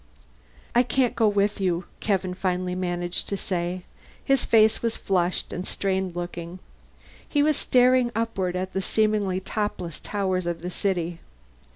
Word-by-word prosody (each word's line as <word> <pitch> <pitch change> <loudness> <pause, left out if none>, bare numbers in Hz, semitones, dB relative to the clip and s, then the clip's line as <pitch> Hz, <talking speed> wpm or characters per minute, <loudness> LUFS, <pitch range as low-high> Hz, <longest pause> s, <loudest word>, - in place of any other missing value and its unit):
"I 240 - +6
can't 250 0 +1
go 225 -2 +4
with 205 0 +1
you," 180 -2 0
Kevin 190 -3 0
finally 180 -1 -1
managed 175 -1 -1
to 200 - -1
say. 180 -1 -2 0.4
His 270 -2 +3
face 220 -1 +4
was 230 -1 -1
flushed 180 -2 0
and 180 +1 -4
strained 190 -2 -1
looking. 175 0 -5 0.7
He 290 -1 +3
was 305 0 +3
staring 250 -1 +4
upward 195 -6 -1
at 185 +1 -3
the 190 - 0
seemingly 210 -2 +1
topless 190 -5 -3
towers 185 -3 -1
of 170 -1 -3
the 180 - -3
city. 175 -3 -1
190 Hz, 150 wpm, -25 LUFS, 180-215 Hz, 0.7 s, I